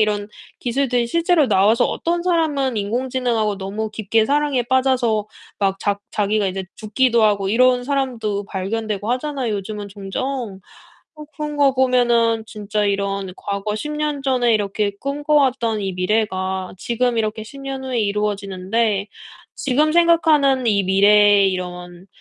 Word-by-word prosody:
이런 210 -1 0 0.3
기술들이 245 -1 0
실제로 335 0 +2
나와서 210 +3 +3
어떤 340 +1 -1
사람은 300 -8 0
인공지능하고 235 -1 -1
너무 210 +3 -4
깊게 220 +1 +1
사랑에 285 -1 +1
빠져서 245 -4 +1 0.3
막 195 -1 0
자 200 -1 -1
자기가 210 0 0
이제 190 0 -3
죽기도 235 +1 +1
하고 200 -2 +2
이런 250 +2 +3
사람도 240 -7 -2
발견되고 210 +2 -3
하잖아요, 255 -3 -2
요즘은 205 +1 -6
종종. 200 +2 -5 0.6
어 300 - -8
그런 300 -1 -5
거 280 -2 +4
보면은 240 -3 +2
진짜 210 0 -3
이런 200 -1 -2
과거 200 +1 -3
10 295 +8 -4
년 300 -2 -2
전에 250 -3 +2
이렇게 205 0 -1
꿈꿔왔던 275 -6 +1
이 195 -1 -3
미래가 190 -1 -1
지금 240 +3 -1
이렇게 215 0 -2
10 235 +6 -11
년 270 -1 -5
후에 255 -2 -2
이루어지는데 205 0 -1 0.5
'지금 295 +3 +1
생각하는 315 -6 +3
이 200 -3 +3
미래의 200 +1 +5
이런 180 0 -6
220 Hz, 315 characters per minute, -20 LUFS, 200-260 Hz, 0.6 s, 미래의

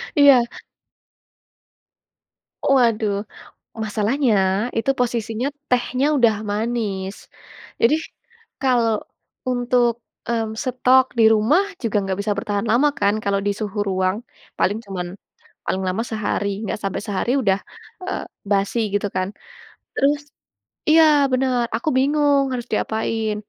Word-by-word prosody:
Iya. 280 -4 +7 2.3
Waduh, 220 -6 +2 0.6
masalahnya 220 +3 +1 0.4
itu 225 - 0
posisinya 235 +1 -1 0.2
tehnya 250 +2 +1
udah 235 -5 +4 0.2
manis. 210 -3 -3 0.5
Jadi, 260 +7 +5 0.7
kalo 235 -5 +2 0.5
untuk, 245 -1 +1 0.3
mmm, 225 -2 -1
stok 255 0 +4
di 225 - +7
rumah 235 - +3 0.2
juga 215 -2 0
nggak 195 0 -3
bisa 205 0 0
bertahan 205 +1 -2
lama 275 +6 +4
kan 200 +1 +3
kalau 200 0 +1
di 205 - +2
suhu 210 -1 -3
ruang, 185 +1 0 0.4
paling 205 +4 +1
cuman, 180 -2 -4 0.6
paling 190 0 -1
lama 200 +5 -1
sehari. 205 -1 -1
Nggak 210 - -3
sampai 195 - -2
sehari 205 +4 -1
udah, 195 -3 +2 0.5
eee, - - -2 0.3
basi 200 +4 +1
gitu 205 0 +1
kan. 185 0 0 0.7
Terus 290 +1 +2 0.7
iya, 320 +1 +7 0.3
bener, 255 -2 +1
aku 235 - -3
bingung 285 0 +3
harus 245 -1 -3
diapain. 220 0 -1
225 Hz, 115 wpm, -21 LUFS, 205-255 Hz, 2.3 s, Iya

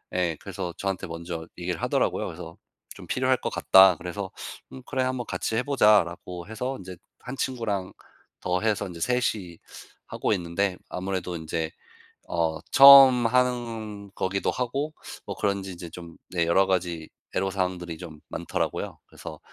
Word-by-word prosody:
예. 85 -4 0
그래서 95 -3 -5
저한테 95 -1 -3
먼저 85 0 -6
얘기를 90 -1 -3
하더라고요. - - 0
그래서 80 0 -9 0.4
좀 - - -11
"필요할 - - +2
것 - - -1
같다." 95 -2 +6
그래서 95 +3 -5 0.4
"응 130 - -9
그래 130 -2 -1
한번 130 -1 -2
같이 110 - -2
해 120 - +1
보자."라고 100 -9 +2
해서 125 +5 -4
인제 95 -1 -9 0.3
1 125 +2 -7
친구랑 110 -9 -2 0.5
더 90 0 0
해서 105 -2 0
3 125 +1 +1
이 90 -5 -9 0.5
하고 - - -2
있는데 90 +1 -1
아무래도 90 -1 -3
인제 80 0 -3 0.6
어 80 -2 0
처음 135 -3 +10
하는 115 -5 -1
거기도 95 +1 -1
하고 135 +5 -2 0.3
뭐 - - -4
그런지 100 -2 -1
인제 85 -1 -9
좀 85 -1 -10
네 85 -2 0
여러 95 +3 +4
가지 85 -4 -1 0.3
애로사항들이 90 -3 -2
좀 80 -4 -10
많더라고요. - - -3
그래서 - - -10
95 Hz, 310 characters per minute, -26 LUFS, 85-115 Hz, 0.6 s, 처음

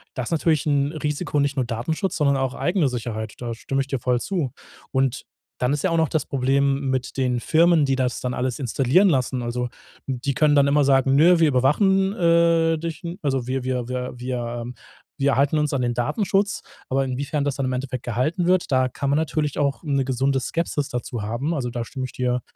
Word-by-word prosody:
das 125 -2 -3
ist - - -6
natürlich 160 -2 +1
'n 145 -1 +1
Risiko, 150 0 -2
nicht 140 0 +1
nur 130 -3 0
Datenschutz, 125 - -2
sondern 140 -3 +3
auch 130 -1 -1
eigene 175 -5 +1
Sicherheit, 110 -3 -5
da 120 -1 -4
stimme 135 +4 -2
ich 135 - -4
dir 135 -3 -2
voll 125 0 +1
zu. 165 -8 -2 0.4
Und 130 -2 0 0.4
dann 125 +2 +1
ist 145 - -1
ja 185 - +2
auch 165 - +1
noch 160 -3 +2
das 155 -4 -1
Problem 135 +1 +1
mit 130 -1 -2
den 125 -2 0
Firmen, 165 +2 +4
die 135 -1 +1
das 125 -2 -1
dann 125 0 -2
alles 125 +1 -2
installieren 135 - +3
lassen. 130 -5 +1
Also 120 +1 -2 0.4
die 135 +1 -2
können 150 +2 +3
dann 140 -1 +5
immer 145 +1 +3
sagen: 135 0 +3
„Nö, 170 +4 +6
wir 160 - +5
überwachen, 190 - +3
äh, 170 -2 +3
dich. 165 0 -5 0.2
Also 135 -4 -1
wir 130 0 -2
wir 125 -2 -2
wir 125 0 -4
wir 120 -1 -4 0.5
wir 140 0 +2
halten 145 +2 +2
uns 150 -1 0
an 130 - 0
den 120 -1 0
Datenschutz.“ 195 - 0 0.3
Aber 135 +1 +1
inwiefern 140 +3 -2
das 140 - -1
dann 135 - -2
im 130 - -1
Endeffekt 130 -1 -4
gehalten 155 - -1
wird, 185 -1 +2
da 130 -1 +3
kann 140 +2 -3
man 145 - +2
natürlich 155 -2 -1
auch 140 -1 0
'ne 140 -3 0
gesunde 135 +1 +1
Skepsis 150 0 -2
dazu 120 -2 -4
haben. 120 +10 -2
Also, 130 -6 -2
da 120 -1 -4
stimme 130 -2 -5
ich 130 - -9
dir 125 0 -1
135 Hz, 215 wpm, -23 LUFS, 125-155 Hz, 0.5 s, Nö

